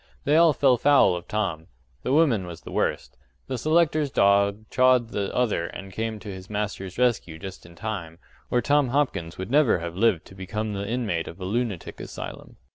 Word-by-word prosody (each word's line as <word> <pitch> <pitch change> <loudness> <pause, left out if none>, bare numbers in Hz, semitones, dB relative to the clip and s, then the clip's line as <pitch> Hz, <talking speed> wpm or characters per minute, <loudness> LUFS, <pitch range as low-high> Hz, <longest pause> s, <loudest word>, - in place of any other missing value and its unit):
They 145 - +2
all 165 0 +6
fell 135 -3 +3
foul 135 -8 +5
of 90 - -7
Tom. 95 -7 -2 0.3
The - - -2
woman 135 - +3
was 85 -2 -9
the - - -10
worst. - - -2 0.3
The 130 -2 -4
selector's 155 0 +2
dog 100 -1 +2
chawed 130 -2 +4
the 100 -3 -2
other 110 -9 0
and 95 +2 -9
came 110 +2 -3
to 105 -3 -7
his 95 0 -10
master's 105 -3 -4
rescue 120 -10 +1
just 90 0 -9
in 85 - -15
time 90 -5 -5 0.3
or 120 -1 +1
Tom 145 +2 +3
Hopkins 120 - -1
would 95 +5 -6
never 145 -7 +4
have 85 0 -5
lived 100 -4 +2
to - - -14
become 105 +3 -4
the 100 +1 -4
inmate 110 -9 -1
of 85 - -9
a 95 - -5
lunatic 110 -2 -3
asylum. - - -8
105 Hz, 195 wpm, -25 LUFS, 95-125 Hz, 0.3 s, all